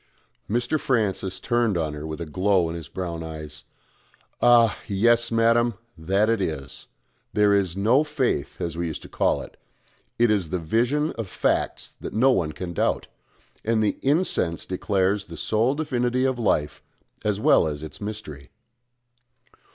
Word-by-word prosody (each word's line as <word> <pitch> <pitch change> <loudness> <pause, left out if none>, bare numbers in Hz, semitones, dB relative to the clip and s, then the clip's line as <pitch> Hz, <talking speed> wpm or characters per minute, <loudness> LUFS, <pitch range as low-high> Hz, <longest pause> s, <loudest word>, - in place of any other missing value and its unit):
Mr. 120 +7 0
Francis 100 -7 0
turned 120 -5 +1
on 80 -3 -1
her 75 +1 -6
with 80 +1 -5
a 85 - -4
glow 95 +2 +2
in 80 - -4
his 80 -4 -7
brown 85 -2 -5
eyes. 75 -2 -8 0.8
"Ah! 120 -2 +5
yes, 120 +4 +2
madam. 115 0 +3 0.2
That 95 +6 +1
is 115 -1 +2
it. 70 -7 -5 0.5
There 105 -1 +4
is 95 -3 +1
no 115 +9 +4
Faith, 150 -4 -1
as 85 -2 -3
we 85 0 -2
used 80 - -6
to - - -10
call - - +1
it: - - -14 0.6
it 120 -1 +4
is 95 -6 0
the 90 - -1
vision 120 - +1
of 110 - -3
Facts - - -1
that - - -6
no 130 +5 +4
one 80 -10 +1
can 85 +2 -6
doubt; - - 0 0.5
and 110 0 +1
the 105 - 0
incense 140 - +1
declares 95 +1 0
the 85 -2 -10
sole 110 - +1
divinity 130 -4 0
of 130 -2 0
Life 75 -9 0 0.4
as 105 -1 0
well 135 - +4
as 75 0 -4
its 80 - -9
mystery." 100 -11 -7
100 Hz, 160 wpm, -24 LUFS, 85-120 Hz, 0.8 s, Ah